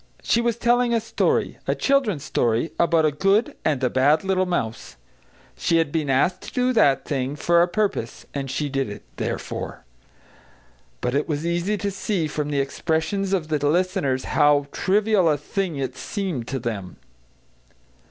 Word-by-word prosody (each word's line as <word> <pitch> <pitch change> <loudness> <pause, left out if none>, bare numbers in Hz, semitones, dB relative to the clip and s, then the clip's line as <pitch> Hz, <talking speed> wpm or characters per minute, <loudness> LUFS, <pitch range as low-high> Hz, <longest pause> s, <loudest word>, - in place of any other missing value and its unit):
She 235 - +2
was 235 -1 +1
telling 240 0 +2
a - - +3
story, 225 - 0
a - - +1
children's 245 - +1
story, 120 -1 0
about 165 -2 +3
a 155 - +3
good 200 - +1
and 140 -4 0
a 125 - +3
bad 145 +4 +3
little 190 -1 +1
mouse. 115 -11 -3 0.6
She 165 - +1
had 165 -3 +1
been 155 -3 -1
asked 175 +8 +2
to - - -9
do 250 0 +1
that 140 - +3
thing, 135 0 -2
for 170 +3 +3
a 175 - +4
purpose, 190 - -2
and 140 -1 -3
she 145 +3 -1
did 135 -4 -2
it, 105 - -8
therefore. - - -4 1.2
But 125 - -1
it 145 +4 0
was 150 +1 -2
easy 175 +5 0
to 200 +1 -2
see 190 -3 -1
from 150 -1 -3
the 145 -1 0
expressions 160 +7 -1
of 175 -5 0
the 155 -1 +1
listeners 155 -4 +1
how 145 -1 +4
trivial 200 -2 +2
a 150 - +2
thing 175 +3 -3
it 135 -2 -3
seemed 180 - -4
to 135 - -2
them. 105 -7 -5
160 Hz, 170 wpm, -23 LUFS, 140-195 Hz, 1.2 s, a